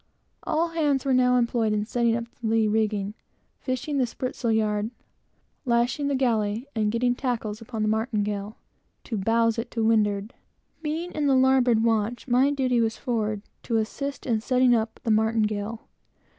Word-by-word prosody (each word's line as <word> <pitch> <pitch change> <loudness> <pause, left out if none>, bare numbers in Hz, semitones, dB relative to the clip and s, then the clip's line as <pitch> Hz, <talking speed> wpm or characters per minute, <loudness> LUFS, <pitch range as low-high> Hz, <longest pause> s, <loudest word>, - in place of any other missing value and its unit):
All 330 +2 0
hands 295 -5 0
were 270 - +2
now 250 0 +4
employed 235 -2 +1
in 210 0 0
setting 235 0 +1
up 235 - -2
the 235 -1 -7
lee 220 0 +3
rigging, 210 -2 0 0.5
fishing 275 +2 -2
the 250 - +2
spritsail 245 -1 -3
yard, 215 -1 +1 0.7
lashing 245 +3 +1
the 280 - +1
galley, 225 -3 0
and 215 -2 +1
getting 245 +2 +1
tackles 235 -4 -3
upon 225 -1 -4
the - - +1
martingale, 215 -2 -1 0.5
to 230 - -4
bowse 230 +3 +2
it 235 +1 -4
to 230 -2 -2
windward. 210 -1 +1 0.5
Being 320 +3 -3
in 300 -2 -1
the 270 - +4
larboard 260 -3 +4
watch, 225 +2 0
my 255 +3 +4
duty 255 -4 +1
was 225 -1 0
forward, 215 -5 -2 0.2
to 230 - -1
assist 275 +6 -3
in 225 -4 0
setting 255 +1 +3
up 225 -1 -1
the 225 - +1
martingale. 220 0 0
230 Hz, 165 wpm, -25 LUFS, 215-255 Hz, 0.7 s, now